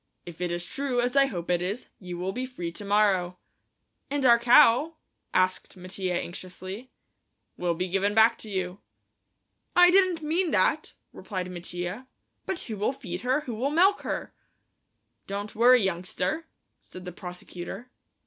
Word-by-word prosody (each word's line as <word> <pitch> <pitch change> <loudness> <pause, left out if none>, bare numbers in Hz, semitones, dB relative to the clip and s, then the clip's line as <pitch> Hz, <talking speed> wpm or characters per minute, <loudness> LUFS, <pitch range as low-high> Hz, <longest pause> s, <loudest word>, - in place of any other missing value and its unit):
"If 175 -1 -10
it 180 - 0
is 175 0 -3
true, 270 +3 -2
as 245 +2 0
I 275 0 +6
hope 175 -8 -4
it 175 -1 +2
is, 200 +7 -3
you 180 -2 -7
will 185 +2 -2
be 255 +4 -4
free 180 -10 -5
to 170 - -9
morrow." 200 -3 +2 0.7
"And 280 -1 -1
our 235 -2 +7
cow?" 255 +5 +5 0.4
asked 185 0 0
Mattia 185 0 -3
anxiously. 185 +6 -7 0.7
"Will 175 -1 -1
be 180 +2 -2
given 195 +3 0
back 220 +1 +5
to 220 - -7
you." 185 -1 -3 1.0
"I 355 0 +8
didn't 370 -4 +3
mean 335 +4 +1
that," - - +1 0.2
replied 185 -3 -5
Mattia; 180 +6 -5 0.4
"but 380 - -3
who'll 215 +2 -2
feed 275 -2 -6
her, 260 +4 +1
who'll 250 0 -2
milk 370 +7 +4
her?" - - -4 0.9
"Don't 200 +1 -5
worry, 245 +1 +6
youngster," 185 - -2 0.3
said 185 0 -12
the 180 - -5
prosecutor. 180 +6 -8
205 Hz, 150 wpm, -27 LUFS, 180-255 Hz, 1.0 s, I